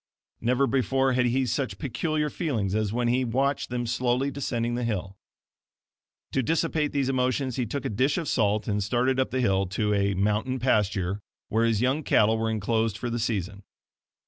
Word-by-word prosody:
Never 125 +4 +2
before 135 0 +1
had 125 -1 +2
he 130 +2 +1
such 125 +3 -2
peculiar 150 +2 -1
feelings 115 - -1
as 110 -1 0
when 120 +1 0
he 125 +2 +2
watched 135 +4 0
them 120 0 -2
slowly 125 +3 0
descending 120 -4 -2
the 120 +1 -2
hill. 100 -4 -3 1.2
To 135 - +1
dissipate 160 +2 0
these 140 -2 0
emotions 130 -1 0
he 125 -3 -1
took 140 +4 -4
a - - 0
dish 130 - +1
of 165 -4 -2
salt 105 -3 +1
and 105 -2 0
started 125 +6 +1
up 130 - +1
the 130 - -1
hill 95 -4 +2
to 105 +3 0
a 100 -1 +1
"mountain 105 +7 0
pasture" 105 -6 +1 0.3
where 115 +2 +2
his 115 -2 +1
young 130 +5 +1
cattle 110 -5 +3
were 110 0 0
enclosed 110 0 0
for 120 0 -4
the 120 - -1
season. 100 -3 -2
120 Hz, 185 wpm, -26 LUFS, 105-130 Hz, 1.2 s, cattle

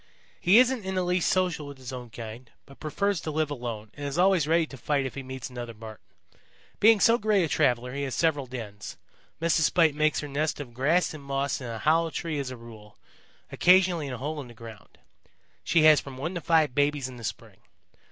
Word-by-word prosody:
"He 185 +5 +5
isn't 255 -2 +4
in 190 0 -4
the 185 - +1
least 180 -1 +1
social 180 -5 0
with 140 -1 -10
his 130 0 -8
own 125 -2 -7
kind 115 +2 -9 0.2
but 140 - -17
prefers 195 +4 -1
to - - -5
live 155 -1 -1
alone 115 -5 -6
and 145 - -9
is 140 - -4
always 180 -4 +3
ready 165 +1 +3
to 145 - -11
fight 140 +1 -1
if 130 - -5
he 140 - -6
meets 130 0 -7
another 120 -2 -7
Marten. 110 -3 -11 0.8
Being 220 0 +6
so 230 +4 +4
great 210 -3 +2
a - - 0
traveler 125 -5 +1
he 140 - -3
has 135 -2 -3
several 145 -5 +1
dens. 110 -5 -8 0.4
Mrs. 165 0 +2
Spite 160 -1 +3
makes 155 +1 +1
her 150 - -6
nest 150 +2 -2
of 130 -5 -8
grass 155 +10 +1
and 150 -2 -10
moss 140 0 -2
in 125 - -6
a 115 -1 -5
hollow 165 +7 +2
tree 155 0 -3
as 135 -2 -3
a 130 - -7
rule, 110 -3 -14 0.5
occasionally 180 -4 +4
in 130 - -5
a - - -5
hole 145 +4 -4
in 130 - -10
the 120 - -14
ground. 110 -2 -13 0.7
She 165 -2 +3
has 155 -1 +7
from 135 -2 -10
one 160 +7 -4
to 175 - -4
five 160 -4 +2
babies 145 -1 +1
in 130 -1 -10
the 115 - -11
spring. - - -7
145 Hz, 225 wpm, -27 LUFS, 125-165 Hz, 0.8 s, has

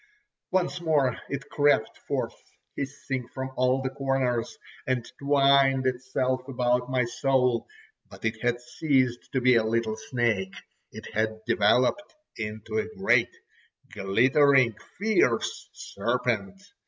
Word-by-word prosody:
Once 180 -1 0
more 145 -7 +2
it 140 +1 -5
crept 145 -6 +2
forth - - -2 0.4
hissing 135 -2 -4
from 130 +1 -6
all 130 +1 +1
the 130 - -1
corners, 135 -3 -1 0.3
and 125 -3 0
twined 140 -1 +4
itself 130 0 -1
about 125 -1 0
my 130 -2 +1
soul; 125 -1 +1 0.4
but - - -10
it 110 0 -2
had 120 0 0
ceased 130 -1 0
to 130 - +1
be 130 0 +4
a 115 - +3
little 110 0 0
snake, 110 -4 -1 0.4
it - - -10
had 110 0 -1
developed 120 - +2 0.2
into 110 - -4
a 215 0 -5
great, 120 -12 +3 0.6
glittering, 125 +5 +3 0.2
fierce 220 - +1
serpent. 195 0 -2
130 Hz, 120 wpm, -26 LUFS, 120-140 Hz, 0.6 s, twined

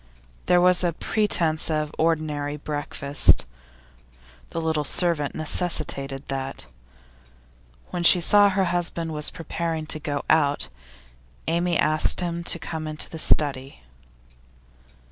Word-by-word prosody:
There 180 - +4
was 180 0 +3
a 175 -1 +1
pretence 170 -5 0
of 155 -1 -2
ordinary 150 -3 -1
breakfast; 145 -1 0 1.0
the - - -4
little 160 -2 -1
servant 160 -1 0
necessitated 145 -4 -1
that. 135 - -5 1.3
When 175 - -3
she 175 +1 +7
saw 205 +4 +5
her 195 0 +1
husband 175 -2 -2 0.2
preparing 165 -1 -4
to 155 0 -2
go 145 -1 -3
out, 145 -2 +2 0.8
Amy 170 0 +1
asked 155 0 +3
him 170 -1 -3
to - - +1
come 160 -1 -6
into 155 0 -1
the 160 - -7
study. 140 - 0
160 Hz, 115 wpm, -24 LUFS, 150-170 Hz, 1.3 s, she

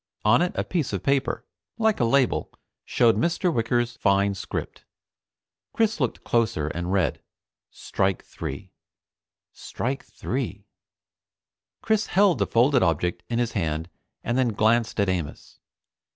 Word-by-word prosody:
On 115 +8 +5
it 180 - +1
a - - 0
piece 165 -7 -2
of - - -3
paper, 140 -1 0 0.3
like 220 -2 +2
a 120 - +3
label, 130 +2 +2 0.3
showed 115 -2 +3
Mr. 170 +1 +1
Wicker's 120 0 0
fine 100 -1 +2
script. 95 - -6 0.9
Chris 225 -3 +1
looked 125 -5 -1
closer 105 -11 0
and 85 +3 -4
read: 95 -3 +1 0.5
"Strike 95 -1 -2
3." - - -7 0.8
"Strike 135 +3 -4
3." 110 -6 -4 1.2
Chris 220 -1 +1
held 195 -2 +3
the - - +1
folded 125 +2 +3
object 85 +1 0
in 115 - -1
his 120 -1 0
hand, 80 -3 -2 0.3
and 120 +3 0
then 120 -4 +2
glanced 110 +2 +2
at 100 - +3
Amos. 90 -5 -4
115 Hz, 135 wpm, -25 LUFS, 100-135 Hz, 1.2 s, On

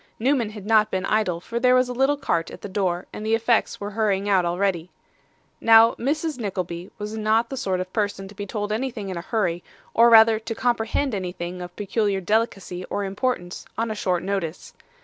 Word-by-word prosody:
Newman 245 -2 +1
had 210 -2 -10
not 215 -1 +4
been 190 -1 -2
idle, 195 -6 +1
for 230 +6 -4
there 250 +1 +4
was 255 0 +3
a 250 - -4
little 270 +3 +2
cart 165 -11 -1
at - - -11
the - - -6
door, 185 -2 -1
and 210 - -6
the 220 +1 +2
effects 230 0 +1
were 205 +1 -5
hurrying 205 -2 0
out 190 -3 +3
already. 175 -1 -1 0.7
Now, 225 0 +7
Mrs. 300 +3 -2
Nickleby 185 -4 -4
was 210 +1 -5
not 220 +2 +1
the - - -2
sort 190 -7 -1
of 185 0 -5
person 205 -3 -2
to 195 - -12
be 205 0 -6
told 205 +1 -3
anything 225 -3 -3
in 185 - -4
a - - -3
hurry, 175 -4 -1 0.3
or 235 +1 +6
rather 220 -1 +7
to 225 +1 -5
comprehend 240 +2 0
anything 180 -2 -4
of 175 0 -8
peculiar 205 -1 0
delicacy 195 -2 -1
or 205 - -3
importance 195 -2 -3
on 230 0 -1
a - - -1
short 180 -4 -1
notice. 185 -4 -4
210 Hz, 205 wpm, -24 LUFS, 185-230 Hz, 0.7 s, Now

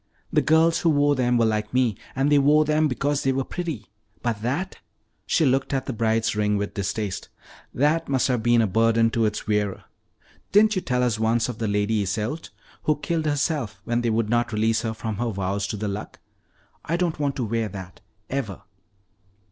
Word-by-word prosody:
The - - +4
girls 160 +1 +4
who 170 - +2
wore 145 -1 +3
them 125 -2 +2
were 115 - +3
like 105 +1 -1
me, 125 -5 +2 0.2
and 135 +2 +1
they 145 - +6
wore 150 +2 +4
them 155 +1 +2
because 140 +2 -1
they 135 - +1
were 135 0 0
pretty. 160 -9 -5 0.4
But 115 -3 -1
that 145 +12 -2 0.2
" - - -47 0.2
she 160 - +3
looked 135 +1 +1
at 135 -1 -1
the 135 - -3
Bride's 115 0 +1
ring 105 0 +1
with 100 0 -3
distaste 100 0 -3 0.4
"that 150 +5 +1
must 135 -2 +2
have 125 -3 0
been 120 0 +4
a - - +3
burden 115 +2 +3
to 115 -1 +1
its 105 0 -2
wearer. 105 -2 -1 0.7
Didn't 215 +1 +5
you 185 - 0
tell 125 -4 0
us 120 -3 0
once 115 +2 +1
of 120 - -6
the 110 - -1
Lady 105 +1 +1
Iseult, 110 - -3 0.4
who 155 - +3
killed 160 +1 -2
herself 145 - -1
when 120 +1 0
they 120 - 0
would 110 0 +1
not 120 +1 +1
release 110 +1 +1
her 110 -1 -3
from 110 -2 -4
her 120 +2 -1
vows 100 0 -2
to 105 - -4
the 105 +1 -3
Luck? 100 +1 -5 0.7
I 170 - -1
don't 175 -3 -1
want 140 -2 0
to 125 - -2
wear 115 0 -1
that, 95 -1 -9 0.3
ever." 110 -8 -4
120 Hz, 205 wpm, -24 LUFS, 110-145 Hz, 0.7 s, they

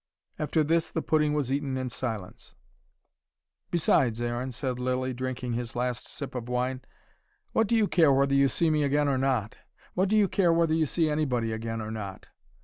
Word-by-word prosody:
After 155 +1 +1
this, 165 +1 +1
the 160 - -3
pudding 150 -1 +2
was 140 -3 0
eaten 140 -2 -1
in 130 -1 -3
silence. 110 -7 -5 1.1
"Besides, 130 -8 +2
Aaron," 120 +2 -2
said 125 0 -3
Lilly, 130 +1 -1
drinking 125 -1 -3
his 120 0 -4
last 125 0 -2
sip 140 -2 -7
of 125 -1 -5
wine, 125 +1 -1 0.7
"what 225 - +2
do 230 - +2
you 220 -2 +3
care 165 -7 +4
whether 140 +1 +3
you 140 0 +5
see 165 +2 +1
me 155 -1 +2
again 145 +1 +2
or 135 -2 +1
not? 125 -6 0 0.4
What 185 +1 +1
do 215 - +3
you 205 -2 +5
care 180 -2 +2
whether 165 -1 +2
you 160 -1 +2
see 165 +3 +1
anybody 130 -7 0
again 115 0 -3
or 110 0 -5
not? 100 -3 -6
130 Hz, 190 wpm, -28 LUFS, 120-155 Hz, 1.1 s, you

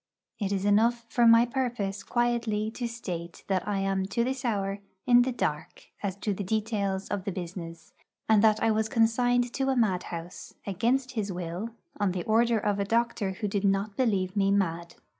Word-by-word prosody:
It 200 -2 -1
is 195 0 -1
enough 230 +3 +3
for 240 0 +4
my 230 +1 +7
purpose 235 -6 -2
quietly 235 -2 0
to 240 +1 -3
state 175 -8 -6
that 190 -2 -1
I 205 -1 0
am 195 -1 0
to 235 +4 0
this 260 +2 -2
hour 200 -4 -1 0.3
in 245 -1 +6
the 255 +1 +1
dark 155 -10 -4
as 195 -3 -2
to 210 - 0
the 200 - -4
details 200 -2 -1
of 200 -2 -2
the 195 - -2
business, 170 -2 -7 0.3
and 220 -1 +5
that 215 -1 +4
I 225 - +4
was 220 0 0
consigned 245 +2 +2
to 270 0 0
a 265 - +2
madhouse, 180 -6 -2
against 240 +7 0
his 215 -5 -2
will, 180 +4 -4 0.3
on 200 -3 +1
the 180 -2 -3
order 230 +1 +3
of 205 -1 0
a - - +2
doctor 225 -2 0
who 210 +2 -3
did 200 0 -1
not 200 +1 +1
believe 200 -6 0
me 195 -1 +2
mad. 170 -4 0
210 Hz, 190 wpm, -28 LUFS, 190-235 Hz, 0.3 s, my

